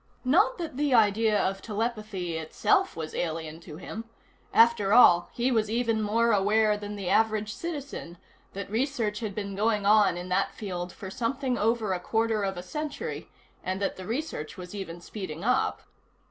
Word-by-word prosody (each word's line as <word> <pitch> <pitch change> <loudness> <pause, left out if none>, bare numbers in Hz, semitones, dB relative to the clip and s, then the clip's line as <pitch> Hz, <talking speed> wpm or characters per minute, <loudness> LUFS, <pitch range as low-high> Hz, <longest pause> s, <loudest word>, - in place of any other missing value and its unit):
Not 400 - +4
that 320 -7 -5
the 285 -3 +2
idea 215 -1 +4
of 195 0 -1
telepathy 215 -5 -3
itself 160 - +1
was 160 -1 -5
alien 160 -1 -3
to 155 -2 -10
him 220 +5 -7 0.5
after 225 -3 +4
all, 175 -8 +7
he 245 +2 0
was 220 -3 +1
even 230 -1 +1
more 230 +3 +2
aware 210 +1 +3
than 205 0 -6
the 195 -3 -5
average 215 +1 +2
citizen 285 - -6 0.4
that 200 +1 -5
research 230 -3 -1
had 215 -4 -4
been 200 -2 -4
going 210 0 +1
on 210 -4 +5
in 180 +1 -6
that 190 +2 0
field 180 -4 -5
for 190 0 -8
something 255 +3 -1
over 225 -3 +1
a 180 - -2
quarter 225 +3 0
of 195 -1 -2
a 175 - -5
century, 300 +11 -5 0.3
and 185 +1 -2
that 200 - -1
the 185 - -9
research 235 - -4
was 180 0 -8
even 175 -4 -6
speeding 175 -4 -7
up. 250 +3 +1
210 Hz, 175 wpm, -28 LUFS, 190-230 Hz, 0.5 s, all